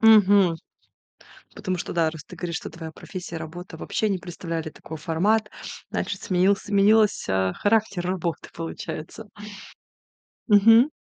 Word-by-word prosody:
Мгм. 205 Hz, -5 st, +6 dB, 1.0 s
Потому 185 Hz, -1 st, -2 dB
что -, -, -5 dB
да, 165 Hz, -2 st, +2 dB
раз 160 Hz, -2 st, -9 dB
ты -, -, -12 dB
говоришь, 170 Hz, -2 st, -3 dB
что -, -, -7 dB
твоя 165 Hz, -1 st, -8 dB
профессия, 175 Hz, 0 st, -7 dB
работа 165 Hz, +1 st, -8 dB
вообще 215 Hz, +5 st, -1 dB
не 195 Hz, -, +1 dB
представляли 165 Hz, -2 st, -5 dB
такой 160 Hz, +1 st, -9 dB
формат, 205 Hz, +8 st, +1 dB, 0.4 s
значит, -, -, -3 dB
сменился 190 Hz, 0 st, +2 dB
сменилось, 210 Hz, +1 st, +4 dB
а, 95 Hz, -1 st, +1 dB
характер 205 Hz, -4 st, +1 dB
работы, 175 Hz, -3 st, -3 dB
получается. 165 Hz, +4 st, -6 dB, 1.2 s
Мгм. 225 Hz, +7 st, +7 dB
180 Hz, 130 wpm, -25 LUFS, 165-205 Hz, 1.2 s, Мгм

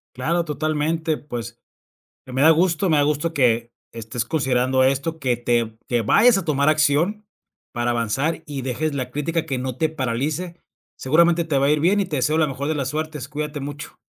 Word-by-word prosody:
Claro, 165 Hz, +7 st, 0 dB
totalmente. 155 Hz, +1 st, -1 dB
Pues, 120 Hz, -4 st, -7 dB, 0.7 s
eh, 130 Hz, -, -10 dB
me 130 Hz, -, 0 dB
da 160 Hz, -, +7 dB
gusto. 170 Hz, +2 st, +2 dB
Me 155 Hz, -, +4 dB
da 145 Hz, -, +4 dB
gusto 150 Hz, +3 st, 0 dB
que 120 Hz, -3 st, +1 dB, 0.2 s
estés 115 Hz, +1 st, -4 dB
considerando 130 Hz, -2 st, +1 dB
esto, 140 Hz, +5 st, 0 dB
que 125 Hz, -4 st, 0 dB
te 120 Hz, -2 st, -1 dB
que 120 Hz, -2 st, +1 dB
vayas 210 Hz, -, +5 dB
a 190 Hz, -, -4 dB
tomar 140 Hz, -1 st, +1 dB
acción 155 Hz, +8 st, +2 dB, 0.5 s
para 120 Hz, 0 st, -1 dB
avanzar 125 Hz, +8 st, -1 dB
y 140 Hz, -3 st, -5 dB
dejes 140 Hz, +4 st, -2 dB
la 130 Hz, -2 st, -3 dB
crítica, 160 Hz, +4 st, -2 dB
que 130 Hz, -2 st, -2 dB
no 130 Hz, -1 st, -4 dB
te 160 Hz, +4 st, +1 dB
paralice. 155 Hz, +5 st, -3 dB, 0.4 s
Seguramente 170 Hz, +4 st, +3 dB
te 150 Hz, -4 st, 0 dB
va 140 Hz, -, +2 dB
a 145 Hz, -, +3 dB
ir 150 Hz, -, +2 dB
bien 190 Hz, +6 st, +3 dB
y -, -, +1 dB
te 155 Hz, -, -3 dB
deseo 150 Hz, +5 st, +1 dB
la 155 Hz, -, +3 dB
mejor 140 Hz, +1 st, -4 dB
de 155 Hz, -, 0 dB
las 140 Hz, -3 st, -2 dB
suertes. 155 Hz, -2 st, -4 dB
Cuídate 150 Hz, 0 st, -4 dB
mucho. 145 Hz, +1 st, -8 dB
145 Hz, 200 wpm, -22 LUFS, 130-160 Hz, 0.7 s, da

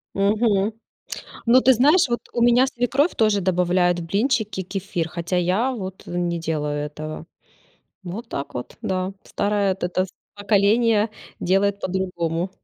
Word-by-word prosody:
Мгм. 205 Hz, +1 st, +2 dB, 0.7 s
Ну 250 Hz, +2 st, +6 dB
ты 260 Hz, -, +6 dB
знаешь, 295 Hz, +8 st, +5 dB
вот 240 Hz, 0 st, -1 dB
у 240 Hz, -, -2 dB
меня 240 Hz, +2 st, +5 dB
свекровь 265 Hz, +5 st, +1 dB
тоже 215 Hz, -3 st, +3 dB
добавляет 180 Hz, -1 st, +2 dB
в 170 Hz, -, -5 dB
блинчики 210 Hz, -1 st, 0 dB
кефир, 180 Hz, -3 st, -3 dB
хотя 170 Hz, +2 st, -3 dB
я 185 Hz, +9 st, +1 dB
вот, 190 Hz, -6 st, -6 dB
э, -, -, -9 dB
не 175 Hz, -1 st, -1 dB
делаю 150 Hz, -3 st, -2 dB
этого. 155 Hz, +2 st, -7 dB, 0.8 s
Вот 200 Hz, +7 st, -6 dB
так 140 Hz, -, -5 dB
вот, 125 Hz, -, -6 dB
да. 185 Hz, +1 st, -2 dB
Старое 205 Hz, -1 st, 0 dB
эт 190 Hz, -, -10 dB
это 180 Hz, +1 st, 0 dB
с 190 Hz, -, -15 dB, 0.3 s
поколение 210 Hz, +2 st, +3 dB, 0.3 s
делает 195 Hz, +2 st, +1 dB
по-другому. 180 Hz, -2 st, -2 dB
195 Hz, 145 wpm, -22 LUFS, 175-225 Hz, 0.8 s, Ну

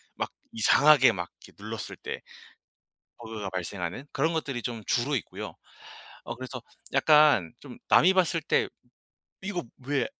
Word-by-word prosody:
막 -, -, -3 dB, 0.2 s
이상하게 135 Hz, +4 st, +6 dB
막 90 Hz, -4 st, -5 dB, 0.2 s
이렇게 -, -, -18 dB
눌렀을 -, -, -6 dB
때 -, -, -6 dB, 1.0 s
버그가 110 Hz, -4 st, -6 dB
발생하는 90 Hz, -, -4 dB
그런 155 Hz, +4 st, +1 dB
것들이 140 Hz, -7 st, -3 dB
좀 115 Hz, 0 st, -4 dB
주로 130 Hz, +4 st, +1 dB
있고요. 115 Hz, -, -6 dB, 0.7 s
어 120 Hz, -, -5 dB
그래서 130 Hz, 0 st, -7 dB, 0.3 s
약간 150 Hz, -, +5 dB
좀 -, -, -11 dB
남이 185 Hz, +3 st, +6 dB
봤을 175 Hz, -3 st, +2 dB
때 155 Hz, -, +1 dB, 0.7 s
'이거 190 Hz, -2 st, -3 dB, 0.2 s
왜 140 Hz, 0 st, +1 dB
130 Hz, 270 characters per minute, -28 LUFS, 110-155 Hz, 1.0 s, 이상하게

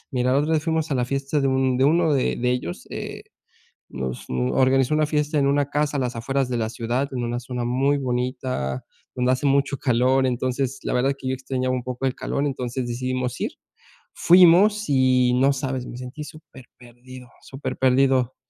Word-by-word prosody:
Mira, 125 Hz, -1 st, 0 dB
la 135 Hz, -, +3 dB
otra 155 Hz, +2 st, 0 dB
vez 155 Hz, -1 st, +1 dB
fuimos 160 Hz, -1 st, -1 dB
a -, -, +1 dB
la 125 Hz, -1 st, +1 dB
fiesta 140 Hz, +3 st, -1 dB
de 135 Hz, -, +1 dB
un 130 Hz, -1 st, +1 dB
de 135 Hz, -, +3 dB
uno 160 Hz, +1 st, +3 dB
de 130 Hz, -, 0 dB
de 125 Hz, +1 st, 0 dB
ellos, 125 Hz, -9 st, -4 dB
eh, -, -, -6 dB, 0.7 s
nos 65 Hz, -1 st, -5 dB
organizó 130 Hz, -, +2 dB
una 155 Hz, 0 st, +3 dB
fiesta 150 Hz, 0 st, 0 dB
en 140 Hz, -, +2 dB
una 140 Hz, 0 st, +1 dB
casa 150 Hz, 0 st, 0 dB
a -, -, 0 dB
las 125 Hz, -2 st, -2 dB
afueras 135 Hz, +2 st, -1 dB
de 120 Hz, -, -1 dB
la 110 Hz, -1 st, -1 dB
ciudad 120 Hz, +4 st, -2 dB
en 125 Hz, -1 st, -2 dB
una 120 Hz, +1 st, -2 dB
zona 125 Hz, -1 st, -5 dB
muy 135 Hz, +4 st, +1 dB
bonita, 125 Hz, -, -3 dB, 0.3 s
donde 125 Hz, 0 st, +1 dB
hace 130 Hz, +3 st, -1 dB
mucho 140 Hz, 0 st, +1 dB
calor, 130 Hz, +1 st, +2 dB
entonces, 130 Hz, +1 st, -2 dB
la -, -, -2 dB
verdad 135 Hz, +2 st, +2 dB
que 130 Hz, -, -7 dB
yo -, -, 0 dB
extrañaba 130 Hz, 0 st, -2 dB
un 125 Hz, -, -4 dB
poco 125 Hz, +1 st, -4 dB
el 130 Hz, -, +1 dB
calor, 140 Hz, -, -2 dB
entonces 125 Hz, -2 st, -3 dB
decidimos 125 Hz, +1 st, -3 dB
ir. -, -, -1 dB, 0.6 s
Fuimos 185 Hz, +5 st, +5 dB
y 130 Hz, -2 st, +3 dB
no 135 Hz, +2 st, +3 dB
sabes, 130 Hz, -2 st, -3 dB
me 120 Hz, -, -8 dB
sentí 130 Hz, +4 st, -7 dB
superperdido, 125 Hz, -4 st, -14 dB
superperdido, 130 Hz, -1 st, +1 dB
130 Hz, 190 wpm, -23 LUFS, 125-140 Hz, 0.7 s, Fuimos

